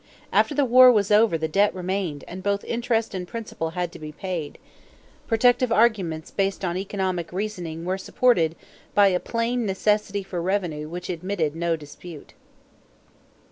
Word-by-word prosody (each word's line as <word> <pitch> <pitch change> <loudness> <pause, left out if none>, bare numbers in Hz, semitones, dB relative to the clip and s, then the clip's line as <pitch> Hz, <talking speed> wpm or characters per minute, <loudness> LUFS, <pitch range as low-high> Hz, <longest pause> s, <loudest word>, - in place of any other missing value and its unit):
After 295 - +3
the 285 -1 +3
war 255 +1 +8
was 210 -3 +1
over 210 -4 +5
the 160 0 -2
debt 200 +6 +2
remained 185 -5 -3
and 185 +1 -7
both 200 +1 -1
interest 230 -2 -1
and 180 -2 -4
principal 215 -6 -5
had 175 -1 -1
to - - -11
be 155 -1 -7
paid. 170 -2 -5 0.7
Protective 245 +1 +3
arguments 200 -9 +1
based 195 -1 -1
on 175 -1 -1
economic 190 -3 -2
reasoning 175 -4 -4
were 185 +1 -1
supported 180 -8 +2 0.4
by 205 -1 +6
a 180 -1 +1
plain 235 +3 -1
necessity 205 0 0
for 185 -2 -4
revenue 170 -5 -2
which 175 +1 -6
admitted 175 -3 -2
no 170 0 0
dispute. 155 +1 -11
190 Hz, 155 wpm, -24 LUFS, 170-215 Hz, 0.7 s, war